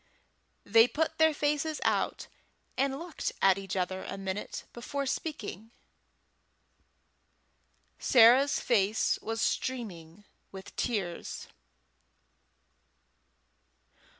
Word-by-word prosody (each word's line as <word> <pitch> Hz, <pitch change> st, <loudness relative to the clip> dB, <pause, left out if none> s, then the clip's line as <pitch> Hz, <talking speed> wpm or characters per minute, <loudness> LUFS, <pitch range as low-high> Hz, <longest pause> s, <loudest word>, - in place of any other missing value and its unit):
They 225 Hz, +3 st, +6 dB
put 315 Hz, +5 st, -2 dB
their 320 Hz, 0 st, +6 dB
faces 300 Hz, +1 st, -1 dB
out, -, -, 0 dB, 0.5 s
and 270 Hz, 0 st, 0 dB
looked 340 Hz, +2 st, -4 dB
at 195 Hz, 0 st, +4 dB
each 195 Hz, -1 st, -5 dB
other 185 Hz, 0 st, -2 dB
a 195 Hz, -, -6 dB
minute 195 Hz, +1 st, -5 dB
before 280 Hz, +4 st, -4 dB
speaking. 270 Hz, -, -4 dB, 2.3 s
Sarah's 255 Hz, +4 st, +6 dB
face 215 Hz, -2 st, +1 dB
was 225 Hz, 0 st, -2 dB
streaming 205 Hz, -8 st, -3 dB, 0.3 s
with 190 Hz, 0 st, -11 dB
tears. 195 Hz, -7 st, -3 dB
225 Hz, 85 wpm, -30 LUFS, 195-280 Hz, 2.3 s, They